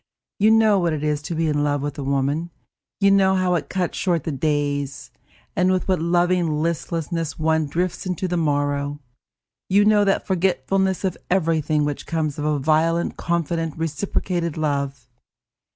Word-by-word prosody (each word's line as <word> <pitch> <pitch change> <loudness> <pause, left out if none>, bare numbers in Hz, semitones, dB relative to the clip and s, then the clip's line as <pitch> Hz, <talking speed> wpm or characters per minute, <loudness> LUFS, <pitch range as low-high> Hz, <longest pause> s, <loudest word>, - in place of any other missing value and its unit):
You 210 +2 +5
know 220 -2 +5
what 170 -3 +1
it 150 -1 -3
is 150 -1 0
to 165 +3 -5
be 165 0 0
in 145 -1 +1
love 145 -1 0
with 145 -1 -3
a - - -3
woman, 140 +4 0 0.5
you 200 -1 +4
know 190 -1 +4
how 185 -1 +1
it 150 -5 -2
cuts 185 -2 -2
short 170 -6 0
the 160 - -3
days, 145 -1 -2 0.4
and 185 +1 +3
with 185 -1 0
what 185 -4 +1
loving 175 -2 +1
listlessness 165 -1 -2
one 160 -1 +1
drifts 175 +5 -2
into 185 0 -2
the 180 - -2
morrow. 145 -2 0 0.7
You 200 +2 +4
know 210 -1 +5
that 195 -1 +1
forgetfulness 190 +1 0
of 185 -3 -1
everything 160 -4 +1
which 145 -1 -4
comes 155 -3 -2
of 145 - -2
a 150 -1 +1
violent 160 +4 +1
confident, 165 -2 -2
reciprocated 170 +1 -2
love. 140 -4 -2
165 Hz, 170 wpm, -22 LUFS, 145-180 Hz, 0.7 s, You